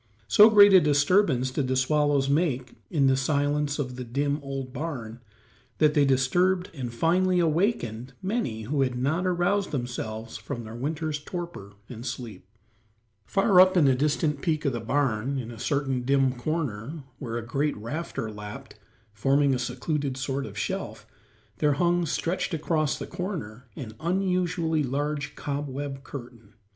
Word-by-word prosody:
So 210 - +8
great 205 -2 +8
a 185 - +9
disturbance 145 -3 +3
did 130 0 -1
the 130 - 0
swallows 145 +1 +2
make 140 -4 0 0.2
in 150 -6 +2
the 135 0 +4
silence 145 +1 0
of 125 -4 -4
the 125 - -4
dim, 140 +4 -1
old 135 -2 -5
barn 125 -8 -5 0.6
that 150 -1 +4
they 145 -2 +4
disturbed 175 +8 +2
and 130 -6 -5
finally 180 +8 +2
awakened 155 - 0
many 190 - -2
who 140 +5 -1
had 125 -2 +1
not 155 +9 0
aroused 185 +3 +1
themselves 115 -4 -4
from 110 +3 -6
their 110 0 -9
winter's 150 +4 -3
torpor 170 - -7
and 120 -1 -8
sleep. 120 -5 -6 0.8
Far 195 -2 +5
up 185 0 +5
in 155 -5 +5
a 135 - +5
distant 150 +2 0
peak 155 -3 -1
of 140 - +1
the 120 - -2
barn, 130 +1 0
in 120 -3 -5
a 115 - -10
certain 135 -3 0
dim 135 0 +2
corner, 140 0 -3 0.2
where 120 -4 -4
a 115 - -5
great 145 +5 -1
rafter 115 0 -4
lapped, 105 0 -9 0.3
forming 135 +5 +2
a 125 - 0
secluded 130 +2 -2
sort 135 +1 -2
of - - -10
shelf, - - -4 0.5
there 150 -1 +3
hung, 175 +3 +1
stretched 170 +3 -1
across 155 -1 0
the - - -5
corner, 160 - -6
an 110 -5 -7
unusually 175 -2 0
large 145 +2 -2
cobweb 140 -1 -4
curtain. 120 -5 -10
140 Hz, 155 wpm, -26 LUFS, 125-165 Hz, 0.8 s, a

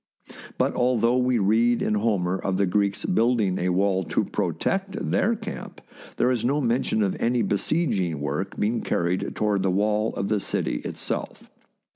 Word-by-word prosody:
But - - +1
although 120 -1 +2
we 125 -1 +2
read 115 +4 +2
in - - 0
Homer 100 -4 +1
of 95 0 -2
the 100 - +3
Greeks 100 +2 0
building 110 -3 +2
a 90 - 0
wall 95 +1 +1
to - - 0
protect 195 +1 -2
their 230 +4 +2
camp, 220 0 -8 0.4
there 125 - +3
is 125 -3 -1
no 140 +4 +1
mention 120 -4 +1
of 100 - 0
any 120 0 +1
besieging 100 - 0
work 75 +7 -3
being 110 +3 0
carried 85 +2 -1
toward 105 -2 +1
the 95 - +1
wall 105 +3 +1
of 100 - -2
the 105 0 +1
city - - -2
itself. - - -5
105 Hz, 165 wpm, -25 LUFS, 95-120 Hz, 0.4 s, the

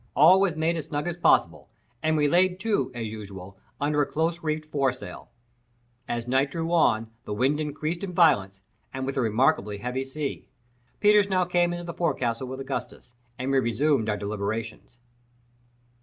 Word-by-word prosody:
All 180 +6 +7
was 185 -5 +2
made 160 +2 0
as 155 - -4
snug 150 +3 -3
as 175 - -2
possible, 175 - +2 0.3
and 155 0 +1
we 150 -1 +3
laid 180 +4 +3
to, 205 - 0
as 115 -2 -4
usual, 100 -3 -9 0.2
under 145 +1 +1
a - - +2
close 165 +3 -1
reefed 155 0 -3
foresail. 135 -3 -2 0.8
As 120 0 -3
night 135 +2 +2
drew 165 +3 -3
on, 115 -9 +2
the 105 - -4
wind 135 +6 +1
increased 155 +4 -3
in 195 - -3
violence, 115 - +3 0.4
with 135 +1 -3
a 135 - +1
remarkably 110 -2 +1
heavy 125 +5 -3
sea. 140 +2 -5 0.5
Peters 210 -1 +5
now 185 -1 +2
came 175 0 +2
into 175 0 -5
the 170 - -5
forecastle 130 -8 -1
with 130 +1 -6
Augustus, 135 -2 -6 0.2
and 130 +2 -2
we 135 - +4
resumed 120 0 +1
our 105 - 0
deliberations. 105 +3 -4
140 Hz, 170 wpm, -26 LUFS, 115-165 Hz, 0.8 s, All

